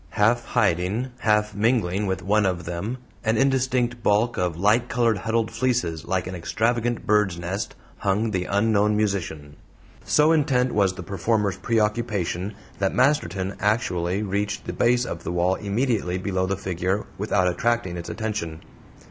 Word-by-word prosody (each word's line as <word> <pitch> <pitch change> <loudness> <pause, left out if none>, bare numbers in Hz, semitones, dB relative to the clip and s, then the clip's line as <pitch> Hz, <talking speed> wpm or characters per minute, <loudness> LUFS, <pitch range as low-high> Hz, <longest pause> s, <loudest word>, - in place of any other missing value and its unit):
Half 115 +3 +3
hiding, 105 +3 0
half 105 -2 +2
mingling 105 -3 +1
with 95 -1 -2
one 105 +2 +3
of 90 -2 -2
them 90 +9 -3 0.3
an 110 0 +1
indistinct 130 -2 +1
bulk 110 +3 +2
of 90 -3 -1
light 105 +6 +2
colored 115 -3 +2
huddled 115 +1 0
fleeces 120 -11 -1
like 95 -1 -1
an 95 - -5
extravagant 115 +6 -1
bird's 105 -4 +2
nest 90 +4 -4 0.2
hung 105 +3 0
the 90 -3 -1
unknown 105 +1 +2
musician. 80 -8 -2 0.5
So 150 +2 +4
intent 130 -5 +2
was 100 -3 +2
the 90 - -7
performer's 100 +2 0
preoccupation 105 -4 -1 0.2
that 95 -1 0
Masterton 100 - +1
actually 95 -2 0
reached 100 +1 -2
the - - -4
base 120 +1 +2
of 85 - -6
the - - -3
wall 90 +1 +2
immediately 105 -3 -1
below 95 -1 -1
the 100 0 -1
figure 95 +1 -2
without 100 -3 +1
attracting 115 0 0
its 85 -1 -6
attention. 100 -8 -4
105 Hz, 150 wpm, -24 LUFS, 95-115 Hz, 0.5 s, So